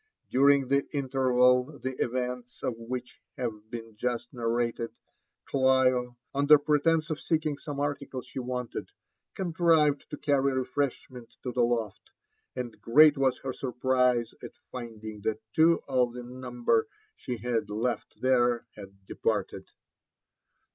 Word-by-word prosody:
During 140 0 +5
the 140 +1 +2
interval 130 0 +3
the 130 0 -4
events 125 0 -4
of 125 - 0
which 120 +2 -7 0.2
have 110 -4 -4
been 115 -2 -8
just 120 +2 -3
narrated, 115 -1 -1 0.6
Olio, 130 -2 +3 0.2
under 145 +2 +6
pretence 155 +2 +2
of 155 - -3
seeing 155 -3 0
some 145 -3 -6
article 140 -3 -3
she - - -7
wanted, 125 -1 -4 0.5
contrived 165 -5 +2
to 150 - -6
carry 140 -1 +2
refreshment 130 -2 -3
to 125 - -3
the 125 - 0
loft; 115 -4 -1 0.5
and 125 -3 -6
great 150 +5 +7
was 135 -2 +2
her 130 -1 -3
surprise 125 -2 +1
at - - -10
finding 110 -4 -7
that 110 +1 -1
two 165 +1 +4
of 125 -3 +1
the 125 0 -7
number 120 -2 -1 0.3
she 125 - -5
had 115 0 -2
left 115 +4 -3
there 120 -2 +2
had 100 -1 -13
departed. - - -2
125 Hz, 130 wpm, -28 LUFS, 120-140 Hz, 0.6 s, great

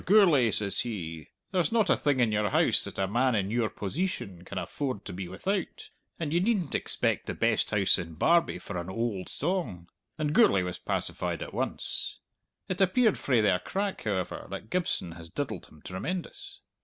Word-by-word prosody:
Gourlay,' 175 - +6
says 100 -2 +1
he, 80 -9 -4 0.2
'there's 180 -5 +1
not 225 -3 +3
a - - +6
thing 145 -3 +1
in 120 -3 +3
your 105 -1 +1
house - - +3
that - - -7
a 95 - +1
man 120 +4 +2
in 100 -1 0
your 115 -2 +1
poseetion 100 - -3
can - - -7
afford 130 -8 -3
to - - -6
be 90 0 -5
without, 190 - -3 0.3
and 160 -2 -2
ye 170 - +4
needn't 190 -5 +1
expect - - +2
the - - -3
best - - +2
house 100 -3 +3
in 85 -2 -6
Barbie 170 - +3
for 95 -3 -5
an 85 +1 -6
oald 105 -2 -2
song!' 130 - -2 0.3
And 150 -1 -1
Gourlay 100 - +5
was 90 -1 -4
pacified - - -2
at - - -9
once! - - -2 0.5
It 185 +1 -2
appeared 215 +3 +4
frae 125 -5 +3
their 95 -4 +3
crack, 195 - -3
however, 95 -4 -2
that 110 - -7
Gibson 175 - 0
has 85 0 -9
diddled 110 - -4
him 75 - -19
tremendous. 165 - -5
115 Hz, 185 wpm, -29 LUFS, -, 0.5 s, Gourlay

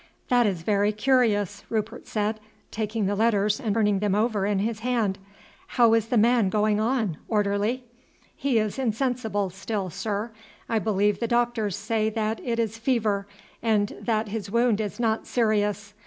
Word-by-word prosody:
"That 245 -2 +4
is 180 -5 -2
very 205 +2 +2
curious," 215 -4 +1
Rupert 225 +1 -3
said, 215 0 -1 0.3
taking 215 0 -2
the 200 - 0
letters 210 0 +2
and 220 -6 -1
turning 210 -3 +2
them 205 -1 +1
over 210 -2 +1
in 205 -1 +1
his 215 +2 -1
hand. 225 -5 0 0.6
"How 235 -2 +6
is 225 -1 +2
the 240 - +1
man 230 -2 +4
going 210 0 +2
on, 220 - 0
orderly?" 210 +4 0 0.5
"He 275 -4 0
is 215 +3 -1
insensible 225 -5 -1
still, 195 0 -4
sir. 215 +5 -3 0.4
I 225 - +1
believe 205 -1 +1
the 235 - -1
doctors 235 -4 0
say 220 -1 0
that 220 0 -2
it 235 -2 -1
is 225 -1 -1
fever, 215 -5 0 0.3
and 215 -3 +1
that 220 -2 0
his 205 -2 -4
wound 235 -1 +2
is 210 +2 -5
not 225 -2 0
serious. 210 -2 0
215 Hz, 165 wpm, -25 LUFS, 205-230 Hz, 0.6 s, How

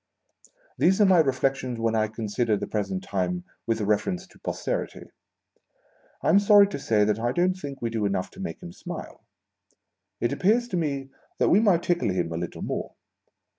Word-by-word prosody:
These 190 +3 +4
are 210 - +6
my 185 -3 +5
reflections 135 -4 0
when 115 0 +1
I 110 -1 +2
consider 110 0 -1
the - - -3
present 95 -3 -3
time 90 -2 -2 0.2
with 115 -1 0
a - - 0
reference 180 - 0
to - - -21
Posterity. - - -4 1.1
I - - +2
am 200 - +6
sorry 205 0 +7
to 165 - -5
say 110 -5 +2
that 105 +1 0
I 120 +1 0
don't 180 +6 +2
think 145 -8 -8
we 115 - -1
do 110 -3 0
enough 95 -2 -2
to - - -14
make 195 -1 -6
him 175 0 -8
smile. 175 -1 -8 1.0
It - - 0
appears 225 +6 +2
to 185 - -3
me 140 -4 -2 0.3
that - - +3
we 190 - +6
might 190 -6 +3
tickle 175 -10 +1
him 90 -3 -1
a - - -3
little 85 0 -5
more. - - -4
130 Hz, 190 wpm, -26 LUFS, -, 1.1 s, sorry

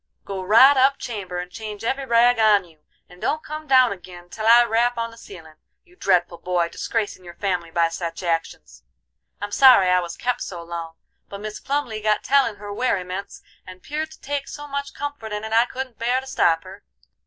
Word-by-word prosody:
"Go 195 -1 -5
right 230 +9 +7
up 270 +1 +4
chamber, 195 -6 -6
and 180 0 -5
change 215 -1 -7
every 265 +3 -2
rag 235 0 +4
on 210 -3 +4
you, 160 -3 -22 0.3
and 180 0 -17
don't 310 +1 -1
come 305 0 -7
down 255 -5 +5
agin 175 -2 -13
till 220 0 -3
I 235 +1 +8
rap 235 +1 +1
on 230 0 -3
the - - -14
ceilin'; 165 -8 -13 0.3
you 360 0 -24
dreadful 175 - +1
boy, 175 -1 0
disgracin' 205 0 -3
your 175 -1 -11
family 180 -4 -2
by 170 0 +2
sech 165 +1 -5
actions. 165 - -3 0.6
I'm 205 0 -5
sorry 245 -7 +7
I 180 0 +4
was 170 -1 -6
kep' 245 0 -2
so 175 -3 -6
long, 165 -1 -7 0.3
but 200 - -8
Mis 215 0 -6
Plumly 270 -6 -3
got 215 0 +1
tellin' 270 -5 +2
her 205 0 -8
werryments, 195 -4 -3 0.2
and 185 0 -12
'peared 310 +2 -4
to 315 - -16
take 280 0 -3
so 295 - -8
much 280 0 -5
comfort 285 -7 -6
in 210 0 -4
it 220 0 -5
I 230 +1 +5
couldn't 255 -1 -7
bear 245 +3 +1
to 265 - -10
stop 165 -11 +1
her. 190 +2 -12
215 Hz, 205 wpm, -22 LUFS, 180-250 Hz, 0.6 s, I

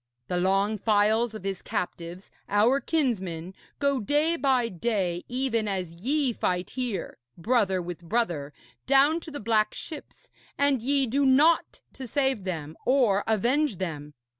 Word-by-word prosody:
The 180 - 0
long 195 +4 +1
files 220 +2 +2
of 215 - -8
his 195 -1 -3
captives, 175 +1 -5 0.2
our 220 +7 +3
kinsmen, 190 - -2 0.2
go 280 -2 +1
day 295 +9 +1
by 265 -6 +2
day, 185 -3 -2
even 245 -3 -1
as 185 -4 -3
ye 275 -1 +1
fight 180 -3 -2
here, 245 -6 -4 0.2
brother 195 -1 +1
with 175 -1 -6
brother, 170 -7 -1 0.4
down 280 +4 +4
to 325 - -10
the 290 -1 -6
black 215 -1 +1
ships, 310 -3 -9 0.3
and 280 -3 +2
ye 275 +2 +2
do 270 +4 0
naught 285 +5 +3
to 260 -2 -8
save 265 -6 0
them 160 -4 -5
or 240 -7 +3
avenge 240 +5 +1
them. 150 -5 -5
225 Hz, 145 wpm, -27 LUFS, 185-270 Hz, 0.4 s, down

